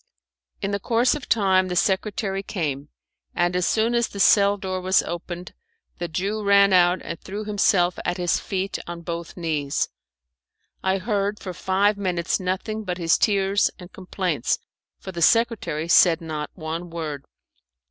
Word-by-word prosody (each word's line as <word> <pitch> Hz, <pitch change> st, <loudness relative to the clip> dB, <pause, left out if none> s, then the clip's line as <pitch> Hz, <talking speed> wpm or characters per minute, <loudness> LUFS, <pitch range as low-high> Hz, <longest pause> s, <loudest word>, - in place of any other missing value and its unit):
In 195 Hz, -, -1 dB
course 235 Hz, +5 st, +2 dB
of 300 Hz, -2 st, -6 dB
time 190 Hz, -4 st, +3 dB
the 180 Hz, -, -3 dB
secretary 195 Hz, +1 st, 0 dB
came, 150 Hz, -8 st, -4 dB, 0.5 s
and 175 Hz, +1 st, +1 dB
as 180 Hz, -1 st, +1 dB
soon 225 Hz, +2 st, +1 dB
as 235 Hz, -1 st, +2 dB
the 200 Hz, -, -9 dB
cell 200 Hz, 0 st, +5 dB
door 185 Hz, -1 st, -4 dB
was 185 Hz, +1 st, +3 dB
opened 175 Hz, +1 st, -6 dB, 0.5 s
the 175 Hz, -, -2 dB
Jew 195 Hz, +6 st, -2 dB
ran 200 Hz, -1 st, +5 dB
out 180 Hz, 0 st, +4 dB
and -, -, -6 dB
threw 205 Hz, +3 st, -6 dB
himself 195 Hz, -4 st, +2 dB
at 175 Hz, -, -1 dB
his 175 Hz, -1 st, +1 dB
feet 195 Hz, -1 st, -3 dB
on 170 Hz, 0 st, -6 dB
both 170 Hz, 0 st, -6 dB
knees, 150 Hz, -5 st, -1 dB, 0.9 s
I 190 Hz, 0 st, +1 dB
heard 205 Hz, 0 st, -1 dB
for 185 Hz, -, -6 dB
five 200 Hz, +3 st, +1 dB
minutes 180 Hz, -3 st, -1 dB
nothing 195 Hz, +4 st, -3 dB
but 180 Hz, -3 st, -3 dB
his 170 Hz, -1 st, +3 dB
tears 200 Hz, -1 st, +2 dB
and 180 Hz, -1 st, -13 dB
complaints, 185 Hz, -, -1 dB, 0.4 s
for 190 Hz, -, -8 dB
the 170 Hz, -2 st, -6 dB
secretary 225 Hz, -6 st, +2 dB
said 170 Hz, -1 st, +5 dB
not 155 Hz, -3 st, -5 dB
one 165 Hz, +1 st, -5 dB
word. 155 Hz, -4 st, -5 dB
185 Hz, 155 wpm, -23 LUFS, 170-200 Hz, 0.9 s, cell